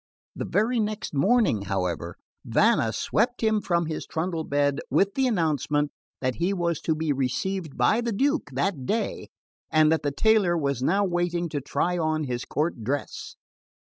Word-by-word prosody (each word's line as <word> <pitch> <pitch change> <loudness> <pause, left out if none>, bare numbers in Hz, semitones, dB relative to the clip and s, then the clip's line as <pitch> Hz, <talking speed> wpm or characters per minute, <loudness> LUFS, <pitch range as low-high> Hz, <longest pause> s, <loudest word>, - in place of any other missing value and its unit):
The - - -4
very 230 +4 +1
next 215 -3 -2
morning, 190 - +3
however, 90 -3 -2 0.3
Vanna 110 - +3
swept 245 - 0
him 220 -1 +2
from 170 -2 +1
his 155 -1 -4
trundle 165 0 -2
bed 145 -1 +1
with 200 0 +2
the 265 -1 +1
announcement 150 - 0 0.3
that 130 -1 -1
he 175 +4 +1
was 170 -3 -1
to 160 - 0
be 155 -1 0
received 155 +5 -2
by 225 - +3
the 235 -1 -2
Duke 280 - 0
that 140 -1 -1
day, 225 +1 -2 0.4
and 155 0 +4
that 160 - +2
the 145 - 0
tailor 195 +2 +3
was 140 -5 -1
now 195 +9 +2
waiting 175 -1 -1
to 145 -2 -3
try 175 +6 -1
on 155 -1 0
his 125 -3 -3
court 150 -6 -2
dress. 140 +5 -4
160 Hz, 170 wpm, -26 LUFS, 140-200 Hz, 0.4 s, and